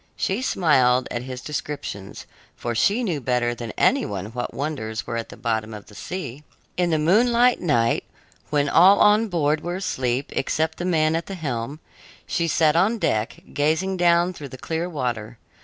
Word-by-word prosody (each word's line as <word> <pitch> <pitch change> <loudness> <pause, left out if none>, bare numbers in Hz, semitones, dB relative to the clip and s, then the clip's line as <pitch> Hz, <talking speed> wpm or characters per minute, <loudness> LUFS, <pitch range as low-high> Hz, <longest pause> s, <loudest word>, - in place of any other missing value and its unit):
She 195 +6 -1
smiled 130 - +3
at 120 - -2
his 125 0 -7
descriptions, 140 -9 -6 0.3
for 120 - -3
she 205 - +2
knew 170 -10 -1
better 125 -1 0
than 120 -1 -6
any - - +3
one 100 +1 -5
what 120 0 -3
wonders 125 -6 -4
were 115 - -4
at 115 -1 -4
the - - -11
bottom 110 -2 -2
of 105 - -10
the - - -16
sea. 150 - -6 0.3
In 180 -1 +1
the 160 - +2
moonlight 235 +9 +3
night, 120 -9 +1 0.4
when 145 -1 +1
all 185 +7 +6
on 210 +2 +5
board 155 -5 +1
were 175 +1 -3
asleep 130 -8 -2
except 160 +3 -1
the 175 - -2
man 160 -3 +2
at 165 - -3
the 195 - -5
helm, 140 -2 -4 0.4
she 170 -1 -1
sat 155 -1 +3
on 200 +7 +3
deck, 110 - -1
gazing 160 +6 +1
down 175 0 +3
through 145 -5 -9
the 130 - -9
clear 165 +6 -3
water. 120 -7 -3
150 Hz, 180 wpm, -23 LUFS, 120-175 Hz, 0.4 s, all